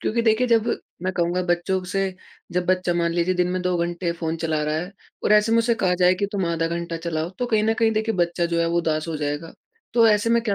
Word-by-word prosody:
क्योंकि 235 +2 0
देखिए 230 +2 +3
जब 230 -1 +2 0.3
मैं 185 0 -1
कहूँगा 175 +1 0
बच्चों 180 +2 +1
ब - - -10
से 195 +1 -1 0.4
जब 180 0 -1
बच्चा 180 -1 +1
मान 170 -1 +1
लीजिए 175 +2 +1
दिन 180 0 +1
में 185 - -1
2 180 0 0
घंटे 175 0 -2
फ़ोन 165 -1 -3
चला 155 -2 0
रहा 150 0 -1
है 175 +5 -4 0.3
और - - +3
ऐसे 210 +2 +4
में 230 - +4
उसे 230 0 +2
कहा 180 - +3
जाए 180 0 +5
कि 200 +2 -1
तुम 195 -4 -1
आधा 165 -1 0
घंटा 170 0 -3
चलाओ 160 +1 -2
तो 245 - -1
कहीं 220 -3 +2
न 225 +1 +2
कहीं 225 -1 +3
देखिए 220 +1 0
बच्चा 175 -1 0
जो 170 0 0
है 170 - +2
वो 170 +1 +1
उदास 155 -1 -1
हो 160 - -2
जाएगा। 150 +2 -4 0.4
तो 230 -1 +6
ऐसे 210 +2 +2
में 235 0 +3
क्या 215 -4 0
180 Hz, 270 wpm, -23 LUFS, 170-210 Hz, 0.4 s, तो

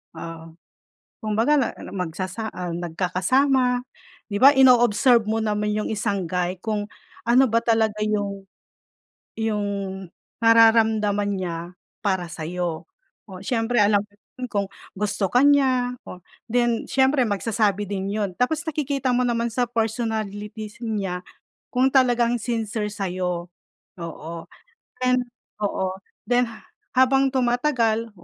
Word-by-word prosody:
ah, 165 -1 -8 0.8
kumbaga 225 +7 +2 0.4
magsasa 185 +4 -4
ah, 180 -1 -5
nagkakasama 245 - +1 0.5
'di 205 - -3
ba? 275 - +10
Ino-observe 245 -3 +5
mo 220 +1 -1
naman 210 -1 0
yung 210 0 -1
isang 200 -4 -1
guy 180 +1 -1
kung 210 0 -2 0.4
ano 245 +3 +5
ba 230 +1 +3
talaga 220 -2 +1
yung 200 -2 -2 0.9
yung 215 -2 0 0.8
nararamdaman 220 -3 +4
niya 175 -3 -3 0.4
para 190 -4 0
sayo. 170 0 -4 0.4
Oh, 185 - -8
siyempre 235 +1 0
alam 205 -1 +4
ko 205 -1 -28 0.4
kung 200 -2 0 0.3
gusto 200 -2 -1
ka 245 - +4
niya, 260 -3 +3 0.6
then 240 -1 +1
siyempre 265 +1 +3
magsasabi 205 0 0
din 195 0 -3
yun. 205 -3 -2
Tapos 300 - 0
nakikita 280 -4 -1
mo 250 - +2
naman 235 -1 0
sa 250 - +2
personalities 220 -1 -3
niya 195 -6 -2 0.5
kung 255 +1 +3
talagang 245 -2 +3
sincere 220 -3 -2
sayo. 180 -3 -3 0.5
Oo, 165 0 -7 1.2
oo. 190 -2 0 0.4
Then 245 0 +3 0.5
habang 270 +1 +4
tumatagal 240 -3 +1
220 Hz, 110 wpm, -23 LUFS, 200-245 Hz, 1.2 s, ba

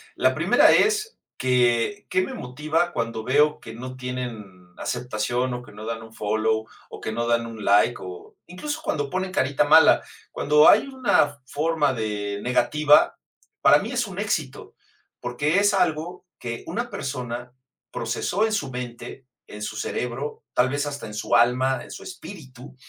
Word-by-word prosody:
La - - +3
primera - - +5
es 430 +1 +2 0.2
que, 125 - +1
¿qué 185 - +2
me - - -4
motiva 155 +7 -1
cuando 115 -1 -3
veo 150 +4 +3
que 110 - -10
no 130 +2 -8
tienen 115 -8 -6
aceptación 125 +1 -2
o 125 0 -5
que 120 - -14
no 105 +1 -10
dan 115 0 -4
un 110 0 -14
follow, 110 +1 0 0.2
o - - -10
que 110 - -3
no 120 +1 -2
dan 115 0 +1
un 110 -2 -8
like, 105 +4 +4
o 90 -1 -10
incluso 295 - -5
cuando 145 - -2
pone 185 0 -2
carita 140 -4 +1
mala?, 160 +2 +6 0.3
cuando 150 +1 +5
hay 220 +6 +5
una 195 - +1
forma 150 0 0
de 105 -3 -3
negativa, 145 +5 +3 0.4
para - - +6
mí - - -5
es - - -1
un - - -7
éxito, - - -3 0.4
porque 145 +9 0
es 205 0 +3
algo 175 -1 -1
que 115 -1 -5
una 240 +1 -3
persona 125 - -5 0.4
procesó 120 - -1
en 220 - -1
su 145 -11 -2
mente, 125 +1 -7 0.2
en 105 - -10
su - - -4
cerebro, 125 +4 -4
tal 125 +1 +3
vez, 145 +2 -1
hasta 145 -5 -5
en 105 - -9
su 105 - 0
alma, 125 +2 +3
en - - -12
su - - -9
espíritu, 155 - -11
125 Hz, 170 wpm, -24 LUFS, 115-155 Hz, 0.4 s, mala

